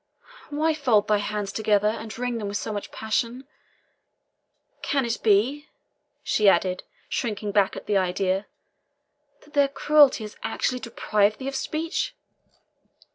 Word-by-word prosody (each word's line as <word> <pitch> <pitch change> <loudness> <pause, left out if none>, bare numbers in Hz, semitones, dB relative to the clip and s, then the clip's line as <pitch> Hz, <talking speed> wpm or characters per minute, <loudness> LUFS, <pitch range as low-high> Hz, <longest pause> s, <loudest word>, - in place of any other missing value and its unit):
Why 310 +2 +1
fold 250 -9 +2
thy 210 -1 +3
hands 205 -1 -3
together, 210 -1 +2
and 220 0 -6
wring 245 -1 -2
them 210 - -4
with 200 0 -2
so 215 - -4
much 205 - -5
passion? 235 +4 -2 1.4
Can 275 -3 0
it 230 -1 -2
be," 240 +9 +2 0.6
she 210 -2 +4
added, 185 0 +1 0.3
shrinking 210 -3 -2
back 200 -2 +2
at - - -8
the 205 - +1
idea, 190 +1 0 1.0
"that 300 - -21
their 285 -1 +4
cruelty 285 -3 +4
has 210 - -9
actually 250 +3 -1
deprived 215 -3 +1
thee 265 - -6
of 275 - -3
speech? 325 - -2
220 Hz, 140 wpm, -25 LUFS, 205-270 Hz, 1.4 s, she